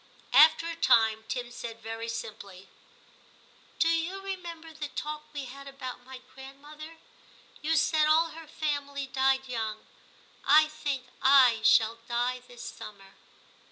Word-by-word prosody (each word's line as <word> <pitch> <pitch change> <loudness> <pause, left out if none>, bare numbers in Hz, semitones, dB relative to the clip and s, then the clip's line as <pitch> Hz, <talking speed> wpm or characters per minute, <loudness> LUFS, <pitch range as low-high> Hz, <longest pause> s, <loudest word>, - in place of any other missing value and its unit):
After 315 +2 +6
a 335 - -4
time 220 -7 +3
Tim 245 -1 -4
said 230 -1 -8
very 225 +1 -6
simply, 200 -4 -8 0.5
* - - -30
Do 325 - +4
you 330 +4 0
remember 345 -4 -7
the 310 -1 -5
talk 300 +1 -6
we 285 -2 -5
had 275 +2 -10
about 260 -2 -8
my 260 0 -11
grandmother? 295 +4 -12 0.6
You 320 +2 +1
said 305 +1 +3
all 325 +2 +4
her 325 0 -11
family 285 -2 -3
died 265 0 +1
young; 220 -3 -4 0.6
I 305 +2 +6
think 290 -4 -4 0.3
/ 235 -4 +4
shall 225 +1 +4
die 245 +1 -1
this 245 -1 -11
summer.' 195 -2 -10
275 Hz, 140 wpm, -28 LUFS, 235-310 Hz, 0.6 s, After